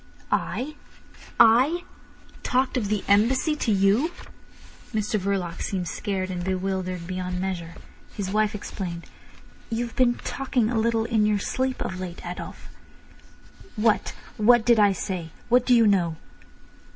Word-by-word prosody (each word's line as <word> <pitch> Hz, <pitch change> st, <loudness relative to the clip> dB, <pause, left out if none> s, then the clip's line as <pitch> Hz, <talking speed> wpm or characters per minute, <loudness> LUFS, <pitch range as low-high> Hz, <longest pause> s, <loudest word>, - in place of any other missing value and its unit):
"I! 295 Hz, +4 st, -1 dB, 0.6 s
I! 255 Hz, +10 st, +5 dB, 0.6 s
Talked 260 Hz, 0 st, 0 dB
of 235 Hz, -5 st, 0 dB
the 210 Hz, -1 st, -1 dB
Embassy 250 Hz, +9 st, +3 dB
to 235 Hz, -, 0 dB
you!" 200 Hz, -, +3 dB, 0.9 s
Mr 215 Hz, 0 st, 0 dB
Verloc 190 Hz, -3 st, -2 dB
seemed 185 Hz, -3 st, -2 dB
scared 190 Hz, -1 st, -3 dB
and 175 Hz, -1 st, -4 dB
bewildered 185 Hz, -1 st, -2 dB
beyond 180 Hz, 0 st, -3 dB
measure. 175 Hz, -3 st, -4 dB, 0.4 s
His 195 Hz, -2 st, -3 dB
wife 215 Hz, 0 st, +1 dB
explained: 175 Hz, -4 st, -6 dB, 0.6 s
"You've 235 Hz, 0 st, -3 dB
been 245 Hz, -2 st, +3 dB
talking 250 Hz, -4 st, -1 dB
a 230 Hz, -, +1 dB
little 225 Hz, 0 st, +1 dB
in 220 Hz, -2 st, +2 dB
your 210 Hz, -1 st, +2 dB
sleep 260 Hz, +5 st, -2 dB
of 185 Hz, -, -5 dB
late, 180 Hz, -2 st, -7 dB
Adolf." -, -, -7 dB, 1.1 s
"What—what 220 Hz, +1 st, +2 dB
did 235 Hz, -2 st, +5 dB
I 205 Hz, -1 st, +6 dB
say? 185 Hz, -3 st, -4 dB, 0.2 s
What 250 Hz, +1 st, +4 dB
do 250 Hz, -, +6 dB
you 230 Hz, -1 st, +5 dB
know?" 180 Hz, -6 st, +2 dB
210 Hz, 135 wpm, -25 LUFS, 185-235 Hz, 1.1 s, I